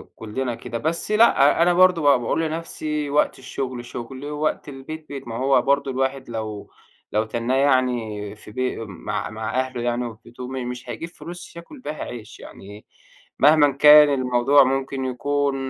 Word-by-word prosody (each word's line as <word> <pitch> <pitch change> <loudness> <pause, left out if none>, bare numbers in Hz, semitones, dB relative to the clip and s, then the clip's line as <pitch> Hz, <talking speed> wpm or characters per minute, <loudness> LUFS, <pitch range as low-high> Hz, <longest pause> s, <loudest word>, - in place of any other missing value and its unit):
كُلنا 120 +2 -4
كده، 120 -1 -6
بس 165 - -2
لأ، 190 -9 +5
أنا 175 +1 +4
برضه 180 -1 +5
ب 145 -3 +5
باقول 120 +7 -1
لنَفْسي 155 -2 -3
وقت 145 -1 +1
الشغل 130 -2 -5
شُغل 130 +3 -8
ووقت 150 0 -2
البيت 155 +3 -8
بيت. 140 -3 -7
ما 115 - -5
هو 135 +1 +3
برضه 140 0 +1
الواحد 135 0 -2
لو 110 -2 -6 0.4
لو 105 +1 +1
تنّاه 120 +3 -2
يعني 120 -7 0
في 105 - -14
بي 130 +3 -2
مع 95 -3 -5
مع 110 +3 -3
أهله 130 -2 -3
يعني 120 0 -1
وفي 110 -2 -8
بيته 125 +2 -9
م 130 -2 -5
مش 125 +1 -8
هيجيب 165 - -5
فلوس 175 +2 -10
ياكل 170 - -11
بيها 155 -10 -6
عيش، 115 -3 -9
يعني 105 +2 -12 0.5
مهمًا 145 0 +6
كان 150 +2 +8
الموضوع 130 +1 +4
ممكن 135 0 -2
يكون 140 +2 -1
135 Hz, 170 wpm, -22 LUFS, 120-150 Hz, 0.5 s, كان